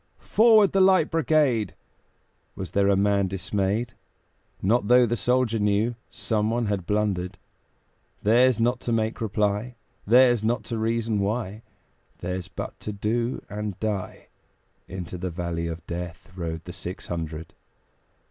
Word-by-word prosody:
"Forward, 220 -2 +5
the 195 - +3
Light 185 -4 +4
Brigade!" 145 - +2 0.8
Was 95 -3 -6
there 100 0 +2
a 100 - +4
man 100 0 +2
dismayed? 100 +5 -1 0.7
Not 105 +2 +1
though 125 +1 +6
the 120 0 0
soldier 125 -2 +1
knew 105 +3 +1 0.2
Someone 110 +2 -1
had 100 -4 -2
blundered; 100 -3 -1 0.9
Theirs 120 +3 +4
not 120 +2 +2
to 120 - -3
make 110 +1 0
reply, 105 +2 -1 0.3
Theirs 120 -1 +5
not 115 +2 0
to 115 -2 -4
reason 115 -1 0
why, 105 +1 -2 0.6
Theirs 90 0 -4
but - - -7
to 105 - -5
do 115 +4 -2
and 105 -1 -5
die: 105 -4 -4 0.6
Into 90 -1 -6
the 90 +1 -3
valley 85 -1 -3
of 85 0 -6
Death 85 +1 -6
Rode 80 -2 -4
the 90 - -7
six 90 +2 -6
hundred. 80 -1 -5
105 Hz, 140 wpm, -25 LUFS, 95-120 Hz, 0.9 s, though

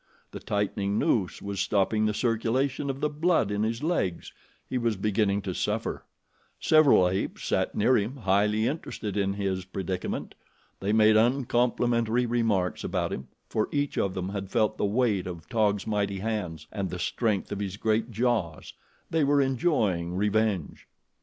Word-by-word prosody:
The - - -7
tightening 100 0 -1
noose 110 - 0
was 100 -1 -4
stopping 105 +2 +1
the 105 - 0
circulation 130 +5 0
of 135 0 -4
the 150 - +2
blood 150 - +1
in 105 0 -1
his 115 +4 -1
legs 125 - -1 0.3
he 130 - -1
was 115 -2 0
beginning 100 0 +1
to 95 - -3
suffer. - - -2 0.5
Several 150 - +5
apes 95 +2 -2
sat - - 0
near 125 +5 +3
him 110 +4 0
highly 105 0 +2
interested 120 - -3
in 100 -1 +1
his 95 -2 -2
predicament. 95 -1 -4 0.5
They 100 +2 -1
made 110 0 +5
uncomplimentary 120 -1 +2
remarks 115 -6 0
about - - -1
him, 65 - -6 0.2
for 110 - -1
each 145 -1 -1
of 95 -2 0
them 95 0 -3
had 100 -1 -5
felt 110 0 +1
the - - +2
weight 105 -3 +1
of 85 -3 -7
Taug's 105 -3 +1
mighty 100 -2 -1
hands 95 -7 -3
and 100 -3 -3
the 90 - -5
strength 105 +2 -1
of 100 - -3
his 100 -1 -4
great 110 +2 0
jaws. 110 -8 -1 0.4
They 160 -2 +2
were 145 +1 +3
enjoying 115 - +1
revenge. 105 -3 0
105 Hz, 160 wpm, -27 LUFS, 100-120 Hz, 0.5 s, Several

